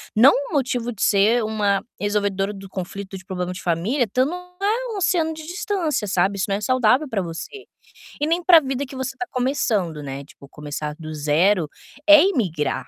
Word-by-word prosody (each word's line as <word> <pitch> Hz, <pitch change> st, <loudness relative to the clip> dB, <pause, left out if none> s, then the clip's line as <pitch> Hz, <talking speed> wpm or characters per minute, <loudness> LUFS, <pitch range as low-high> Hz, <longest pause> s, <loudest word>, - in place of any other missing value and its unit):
não 245 Hz, +6 st, +8 dB
um 285 Hz, +4 st, -3 dB
motivo 245 Hz, -3 st, 0 dB
de 210 Hz, -, -9 dB
ser 215 Hz, +4 st, +3 dB
uma 210 Hz, -2 st, 0 dB, 0.2 s
resolvedora 205 Hz, -1 st, 0 dB
do 195 Hz, -1 st, -10 dB
conflito 190 Hz, +1 st, -6 dB
de 190 Hz, -, -17 dB
problema 180 Hz, -2 st, -3 dB
de 185 Hz, -, -8 dB
família, 190 Hz, -, 0 dB
estando 255 Hz, -, 0 dB
a 370 Hz, +6 st, -2 dB
um -, -, -4 dB
oceano 335 Hz, -4 st, +1 dB
de 315 Hz, -, -9 dB
distância, 350 Hz, -, -2 dB
sabe, 195 Hz, +1 st, +1 dB
isso 190 Hz, -, 0 dB
não 195 Hz, -, 0 dB
é -, -, -7 dB
saudável 255 Hz, +4 st, +2 dB
pra 215 Hz, -, -1 dB
você. 170 Hz, -, -7 dB, 0.5 s
E 295 Hz, -, +1 dB
nem 335 Hz, +3 st, 0 dB
para 340 Hz, -2 st, +8 dB
vida 270 Hz, -1 st, -3 dB
que 270 Hz, -, -10 dB
você 260 Hz, 0 st, -4 dB
tá 245 Hz, -, -4 dB
começando, 225 Hz, -, -1 dB
né, 140 Hz, -1 st, -6 dB
tipo 140 Hz, 0 st, -16 dB
começar 150 Hz, 0 st, -6 dB
do 155 Hz, -2 st, -7 dB
zero 155 Hz, +4 st, +2 dB, 0.4 s
é 305 Hz, 0 st, +9 dB
imigrar, 190 Hz, -, -1 dB
215 Hz, 190 wpm, -22 LUFS, 185-285 Hz, 0.5 s, é